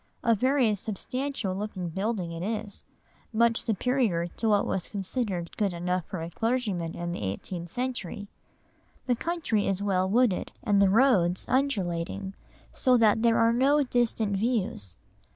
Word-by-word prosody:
A 230 - +4
very 255 0 +2
substantial 225 +2 -3
looking 190 -3 -4
building 195 0 -2
it 165 0 -6
is, 210 0 -4 0.5
much 230 +1 +3
superior 225 -5 +1
to 220 +6 -2
what 205 -1 +3
was 185 - -2
considered 195 -3 -3
good 200 -4 0
enough 180 0 -1
for 175 -4 -5
a 165 - -6
clergyman 210 -7 -1
in 175 0 -4
the 175 - -5
eighteenth 170 - -5
century. 240 -6 -4 0.8
The 250 - +2
country 315 -8 -1
is 195 0 -1
well 190 -2 +1
wooded, 230 -2 +2
and 205 -3 +3
the 195 - +5
roads 190 -6 +3
undulating, 195 -7 -1 0.4
so 255 -2 +3
that 220 -1 +4
there 230 -1 +4
are 230 0 +4
no 280 +4 +3
distant 230 -5 0
views. 195 - -2
205 Hz, 150 wpm, -27 LUFS, 180-240 Hz, 0.8 s, the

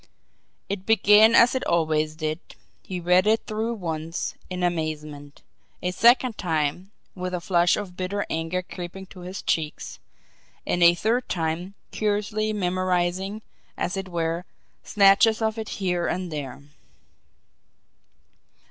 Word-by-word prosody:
It 195 -1 -4
began 220 +1 +6
as 235 - +6
it 260 - -1
always 155 -2 +1
did. 155 0 -3 0.4
He 185 -1 -5
read 180 +3 +3
it 220 +1 +2
through 220 +2 -2
once, 165 -3 -4 0.2
in 180 -1 -4
amazement; 155 -4 -4 0.4
a 180 - 0
second 235 +4 +4
time, 165 +1 -1 0.2
with 180 -1 -4
a - - -2
flush 175 0 +2
of 195 -4 -6
bitter 190 +3 -2
anger 165 +3 -2
creeping 180 +1 -8
to 185 - -12
his 180 +2 -7
cheeks; 155 -2 -2 0.7
and 175 - -1
a 170 0 +7
third 235 +7 0
time, 170 +3 -2 0.2
curiously 215 +1 -1
memorising, 185 +1 -1 0.3
as 180 - -2
it 195 -1 -5
were, 170 0 -2 0.4
snatches 205 +2 +4
of 220 0 -1
it 220 - -5
here 180 -3 -1
and 180 -1 -3
there. 140 -3 -6
180 Hz, 130 wpm, -25 LUFS, 165-205 Hz, 0.7 s, a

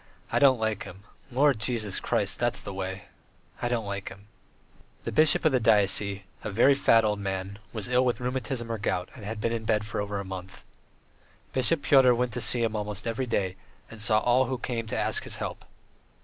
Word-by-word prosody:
I - - +2
don't 135 -3 +5
like 110 -1 -1
him. 95 -1 -10 0.3
Lord 135 -1 +3
Jesus 110 -3 -1
Christ.... - - -1
That's - - +1
the 100 - -6
way. 95 0 -5 0.6
I 120 - 0
don't 115 -3 -1
like 100 -1 -5
him." 100 - -13
III 105 +1 -30 0.2
The - - -4
bishop 155 -1 +4
of - - +5
the 130 - +2
diocese, 100 -2 +3 0.2
a - - -3
very 120 +7 +4
fat 115 -4 +4
old 105 -1 0
man, 95 0 -4
was 110 -4 -4
ill 125 0 +2
with 125 -1 0
rheumatism 125 -1 -3
or 115 - -3
gout, 90 -3 -2
and 115 - -12
had 110 +1 -5
been 115 +2 -1
in 115 -1 -3
bed 110 -1 0
for 105 - -3
over 100 0 -4
a 100 - -6
month. 95 -1 -9 0.9
Bishop 140 +4 +2
Pyotr 130 -3 +5
went 125 0 -1
to 125 - -3
see 115 +2 +3
him 110 -1 -1
almost 105 0 -5
every 115 +3 -2
day, 95 -5 -1 0.3
and 115 -2 -7
saw 110 0 +5
all 125 +2 +3
who 130 +1 -3
came 115 -2 -4
to - - -3
ask - - +4
his - - -2
help. - - -6
110 Hz, 215 wpm, -27 LUFS, 100-125 Hz, 0.9 s, don't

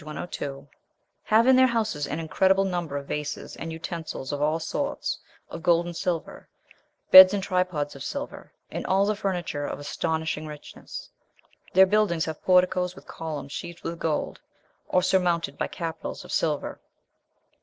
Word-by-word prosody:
102), 145 -2 -6 0.6
"have 220 +2 +4
in 260 0 +6
their 260 0 +6
houses 220 - -1
an 155 - -3
incredible 190 +4 +2
number 175 -6 -2
of 140 - -6
vases, 150 +1 -4
and 165 - -5
utensils 160 -4 -5
of 145 0 -3
all 155 +2 +1
sorts, 280 - -2 0.3
of 165 - -6
gold 170 0 +3
and 175 -1 -6
silver, 175 -2 -3 0.6
beds 185 +1 +11
and 195 - -2
tripods 180 -7 -1
of 135 - -8
silver, 285 - -6 0.2
and - - -4
all 195 +1 +3
the 210 +1 +1
furniture 180 -7 -2
of - - -4
astonishing 160 +1 -2
richness. 150 -1 -9 0.6
Their 190 +1 +8
buildings 190 -5 +2
have 160 -1 -6
porticos 180 0 +3
with - - -14
columns 155 -4 -6
sheathed 170 +3 -7
with 165 0 -4
gold, 155 -2 -2 0.5
or 185 - +3
surmounted 175 -5 +1
by - - -2
capitals 165 -2 -6
of - - -10
silver. - - -1
170 Hz, 155 wpm, -26 LUFS, 155-190 Hz, 0.6 s, beds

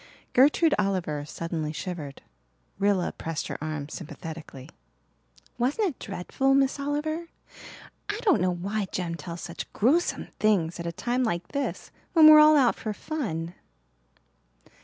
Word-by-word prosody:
Gertrude 295 +5 +5
Oliver 180 -7 -1
suddenly 160 -1 -4
shivered. 155 -4 -6 0.6
Rilla 200 -2 +2
pressed 165 -2 -5
her - - -5
arm 155 -2 -4
sympathetically. 155 -4 -8 0.9
"Wasn't 285 - +1
it 300 - -5
dreadful, 265 +8 0
Miss 275 +1 +2
Oliver? 305 +4 -2 0.8
I 415 - -1
don't 390 - +4
know 185 - +2
why 195 +4 -2
Jem 175 -2 -2
tells 170 0 -7
such 170 - -7
gruesome 295 +11 +1
things 180 -6 +2
at 170 - -4
a - - -2
time 245 +9 -1
like 175 -7 -2
this 280 -1 -4 0.2
when 320 -3 +7
we're 305 0 +10
all 305 0 +7
out 255 -4 +4
for 215 - -4
fun." 195 - -4
200 Hz, 140 wpm, -27 LUFS, 165-280 Hz, 0.9 s, we're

